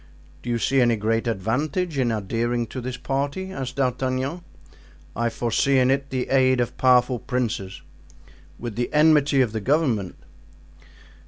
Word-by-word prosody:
"Do - - -7
you 120 - +1
see 135 +4 +2
any 120 -1 +3
great 115 +2 -1
advantage 145 - -1
in 120 -3 +1
adhering 115 +3 -1
to 130 - -6
this 125 +1 -5
party?" 140 +9 -3
asked 130 -7 -5
D'Artagnan. 130 +4 -1 0.7
"I 120 +1 0
foresee 120 +4 +1
in 130 0 +4
it 140 0 -1
the 130 -1 -3
aid 130 -1 +3
of 120 - -1
powerful 125 -1 +3
princes." 110 -7 -3 0.7
"With 120 -3 -6
the 120 +1 -2
enmity 150 -2 +4
of 120 -4 +1
the 110 -1 -3
government." 125 - 0
125 Hz, 150 wpm, -23 LUFS, 115-135 Hz, 0.7 s, in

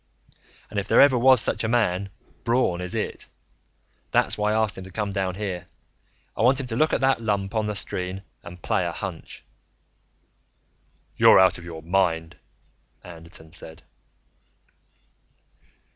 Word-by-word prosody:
"And 105 - -1
if 100 - -5
there - - +4
ever 140 -2 +7
was 130 -1 +5
such - - +1
a - - 0
man, 100 -5 0 0.3
Braun 115 -7 +1
is 90 0 -5
it. - - -4 0.8
That's - - +2
why 105 0 0
I - - 0
asked 110 -3 +1
him 95 - -7
to - - -11
come 105 +1 -3
down 95 -2 -2
here. 95 -3 -5 0.7
I - - -3
want 130 +4 +4
him 135 - -3
to 115 -2 -5
look 155 +6 +2
at - - 0
that 135 -2 +2
lump 100 -2 -2
on 110 -2 0
the 105 - -3
screen 95 0 -1 0.2
and 85 0 -12
play 110 -5 0
a 85 - -2
hunch." 85 0 -8 1.7
"You're - - +7
out 95 -1 +4
of 85 - -12
your 80 -2 -9
mind," 85 -2 0 0.7
Anderton 85 -2 -10
said. 80 -1 -7
95 Hz, 160 wpm, -24 LUFS, 90-110 Hz, 1.7 s, ever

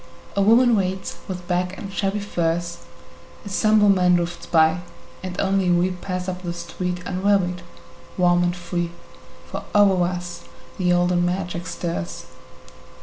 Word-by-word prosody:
A 200 - +2
woman 230 +4 +5
waits 190 -1 -2
with 180 -2 -6
bag 180 +1 0
and 195 -1 -7
shabby 200 +1 -1
furs, 170 -3 -1 0.7
A - - -6
somber 215 +1 +4
man 180 -2 +5
drifts 175 0 -2
by, 160 +1 +4 0.4
and 185 -1 -5
only 195 -1 +2
we 175 +1 +3
Pass 180 0 -4
up 180 0 -4
the 175 -2 -4
street 180 +1 -4
unwearied, 185 -1 +1 0.6
warm 175 -1 +4
and 175 0 +1
free, 175 -1 -3 0.6
For - - -6
over 195 -3 +5
us 175 -1 -4 0.4
the 180 -1 +2
olden 175 0 +3
magic 180 0 -2
stirs. 85 - -4
180 Hz, 145 wpm, -23 LUFS, 175-190 Hz, 0.7 s, woman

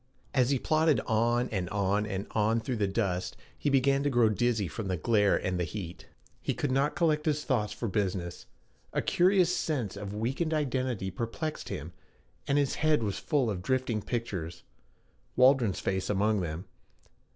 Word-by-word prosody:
As 130 -2 +3
he 140 - +3
plodded 155 -1 +2
on 120 +2 +1
and 95 -4 -2
on 100 +1 0
and 100 -1 -3
on 110 +1 +2
through 120 +2 -3
the 105 -2 +1
dust, 95 -3 -1 0.2
he 145 - -1
began 135 0 +3
to 145 - +1
grow 120 -4 +4
dizzy 110 -2 +1
from 100 +6 -5
the 95 -1 -1
glare 105 +3 +3
and 90 -1 -2
the - - +1
heat. 85 0 -6 0.3
He - - -1
could 145 - -1
not 135 +3 +1
collect 160 -3 +1
his 150 -1 +1
thoughts 110 -6 0
for 115 - -4
business. 90 -3 -2 0.5
A - - 0
curious 180 -1 +3
sense 130 - -2
of 100 0 -6
weakened 135 +9 -1
identity 130 -9 -1
perplexed 120 - -4
him, - - -6 0.5
and 140 - +2
his 140 -2 +2
head 155 -5 +3
was 100 -3 -2
full 145 -6 +1
of 100 -5 -2
drifting 125 0 0
pictures 95 -8 -4 0.7
Waldron's 125 -5 +4
face 95 -1 -1
among 105 0 +2
them. 85 +2 -4
115 Hz, 175 wpm, -29 LUFS, 100-135 Hz, 0.7 s, grow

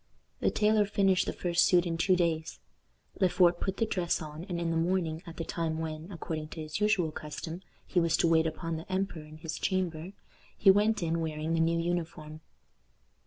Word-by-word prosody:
The - - +2
tailor 210 -1 +3
finished 195 -2 +2
the - - 0
first 175 -1 +1
suit 180 -1 +4
in 170 -1 -1
two 185 +3 +3
days. 165 -2 -1 0.6
Le 190 -2 +4
Fort 175 -1 +4
put 190 0 -2
the 225 - +2
dress 180 -5 0
on, 155 +1 -7
and 175 -4 -3
in 170 -1 -1
the - - 0
morning, 165 -1 0
at 165 - -9
the 165 - -2
time 160 -1 -2
when, 160 +2 -5
according 160 -3 -5
to 160 - -9
his 155 +3 -4
usual 210 -6 +2
custom, 155 +4 -6 0.2
he 180 - +1
was 165 -2 +2
to - - +3
wait 160 0 +4
upon 165 +1 -3
the 160 +4 -9
emperor 185 -3 -1
in 155 0 -12
his 155 0 -6
chamber, 180 -2 -2 0.4
he 195 - +7
went 210 0 +2
in 165 0 0
wearing 155 0 -2
the 165 - +1
new 165 +1 +2
uniform. 165 -2 -3
170 Hz, 205 wpm, -30 LUFS, 160-185 Hz, 0.6 s, he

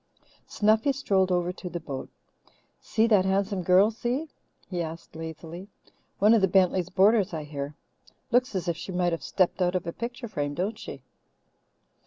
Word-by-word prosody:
Snuffy 220 +6 +3
strolled 195 -9 +1
over 180 0 +1
to 180 -1 -7
the 175 0 -4
boat. 140 -5 -6 0.7
"See 220 0 +1
that 210 -5 +4
handsome 195 0 0
girl, 185 +5 +5
Si?" 245 +7 -2 0.4
he 180 -2 -3
asked 165 0 -7
lazily. 165 +3 -7 0.5
"One 210 +3 +5
of 225 - +4
the 190 - +4
Bentleys' 185 -1 +2
boarders, 195 -1 +3
I 155 - -4
hear. 145 0 -6 0.6
Looks 245 -2 +2
as 180 -2 -2
if 170 - 0
she 170 +3 -7
might 180 -1 +1
have 165 - -2
stepped 185 0 0
out 180 0 +2
of 180 - -1
a 170 - -4
picture 240 +1 -5
frame, 145 -8 -3
don't 205 +6 -2
she?" 135 -2 -8
185 Hz, 175 wpm, -27 LUFS, 170-210 Hz, 0.7 s, girl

